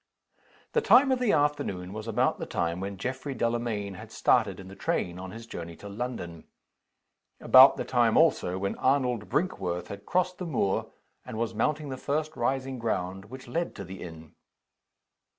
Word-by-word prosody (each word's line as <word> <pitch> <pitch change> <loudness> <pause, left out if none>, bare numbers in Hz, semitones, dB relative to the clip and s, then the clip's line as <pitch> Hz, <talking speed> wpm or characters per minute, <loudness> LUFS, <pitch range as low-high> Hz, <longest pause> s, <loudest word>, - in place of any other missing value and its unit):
The 465 - +2
time 280 - +6
of 260 - +2
the 245 -4 +2
afternoon 100 -11 0
was 110 +1 -6
about 115 - +1
the - - -4
time 85 +1 -1
when 100 +1 -5
Geoffrey 130 +5 -4
Delamayn 115 -4 -1
had 110 +4 -11
started 110 -5 +2
in 95 - -10
the 95 - -10
train, 90 -2 -2
on 95 0 -7
his 115 +3 -9
journey 85 -6 -7
to 100 - -11
London. 100 -6 -5 0.9
About - - +8
the - - -3
time - - +3
also, 90 +1 +3
when 100 +1 -2
Arnold 125 -5 +1
Brinkworth 90 - -1
had 100 0 -9
crossed 180 0 0
the 180 - -4
moor, 100 -11 0 0.3
and 110 - -7
was 115 0 -1
mounting 150 +6 -1
the 130 - -4
first 155 +3 -2
rising 130 +1 -1
ground 95 -4 -2
which 130 +4 -11
led 170 +8 -2
to 100 - -6
the 95 +1 -9
inn. 80 -2 -10
115 Hz, 175 wpm, -28 LUFS, 95-135 Hz, 0.9 s, About